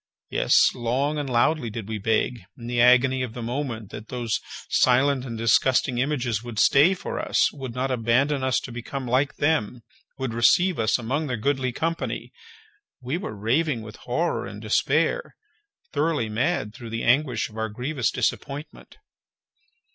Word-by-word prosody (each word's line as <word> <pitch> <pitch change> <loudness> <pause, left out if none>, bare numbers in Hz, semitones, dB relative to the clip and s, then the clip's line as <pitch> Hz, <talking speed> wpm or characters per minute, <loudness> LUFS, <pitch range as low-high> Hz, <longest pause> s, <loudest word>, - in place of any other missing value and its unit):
Yes, - - +4
long 135 +6 -1
and 145 -2 -3
loudly 125 +2 +2
did 110 -2 -6
we 110 -1 -4
beg, 115 +3 0 0.2
in 120 - -10
the 120 0 0
agony 125 +1 +5
of 125 -3 -4
the 120 - -5
moment, 120 -4 -4
that 110 +1 -8
those 120 -3 -2 0.3
silent 130 +1 +3
and 115 -3 -5
disgusting 120 +2 +2
images 125 -5 0
would 120 -2 -8
stay 145 - +5
for - - -5
us, - - +1
would 130 -4 -7
not 130 +1 -1
abandon 130 +4 +1
us 130 -1 +2
to 125 - -8
become 125 +3 -5
like 130 +4 +1
them, 125 -6 0 0.3
would 130 -3 -3
receive 165 - +3
us 110 0 +2
among 135 +6 -2
their 125 -3 -2
goodly 130 +2 0
company! 165 +6 -3 0.7
We 130 +6 -3
were 145 - -6
raving 120 +4 0
with 110 -1 -10
horror 160 +8 -2
and - - -8
despair—thoroughly 165 - -1
mad 115 0 -1
through 120 -2 -9
the 115 0 -3
anguish 125 -2 +2
of 110 - -16
our 110 0 -2
grievous 125 +4 -1
disappointment. 140 - -4
125 Hz, 160 wpm, -24 LUFS, 115-145 Hz, 0.7 s, agony